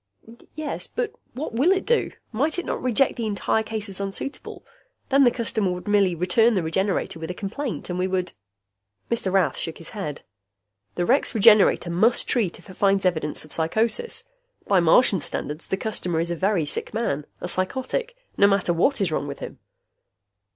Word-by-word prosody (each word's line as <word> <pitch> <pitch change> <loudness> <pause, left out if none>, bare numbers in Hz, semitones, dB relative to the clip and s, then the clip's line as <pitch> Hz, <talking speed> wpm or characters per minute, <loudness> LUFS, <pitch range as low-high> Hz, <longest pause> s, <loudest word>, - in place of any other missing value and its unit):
"Yes. 310 -2 -4
But 470 -3 -3 0.2
what 270 -2 -5
will 275 +11 +3
it 385 0 +1
do? 475 - +2 0.2
Might 285 +9 +1
it 355 - -2
not - - -3
reject 255 +2 +2
the 230 -2 -2
entire 210 +1 0
case 220 -1 -3
as 195 -1 -6
unsuitable? 200 +8 -5 0.4
Then 275 0 +5
the - - +7
customer 225 -5 0
would 180 +3 -8
merely 200 -4 +3
return 215 +7 +3
the 185 - +1
Regenerator 180 0 -1
with 160 +1 -6
a 180 - -4
complaint 210 - -4
and 180 0 -3
we 185 - +1
would 185 -1 -2 0.4
" 100 0 -35
Mr. 235 -5 0
Rath 190 -2 +2
shook 165 - -3
his 165 - -9
head. 190 -9 -5 0.7
"The 175 - 0
Rex 260 +2 +2
Regenerator 210 -5 +5
must 220 +8 +3
treat 215 -8 0
if - - -18
it 190 - -10
finds 195 0 +2
evidence 160 -4 0
of 155 - -5
psychosis. 225 - -1 0.4
By 195 -2 +4
Martian 185 +4 +5
standards, 150 +1 -4
the 190 - -1
customer 180 -6 -2
is 170 +1 -1
a - - -1
very 190 -2 +1
sick 145 - -4
man, 150 -11 -1
a - - -4
psychotic 260 - -2 0.2
no 200 - +6
matter 195 -3 +2
what 235 +9 +2
is 185 -4 +1
wrong 145 - -1
with 140 - -6
him." - - -8
195 Hz, 190 wpm, -24 LUFS, 175-235 Hz, 0.7 s, the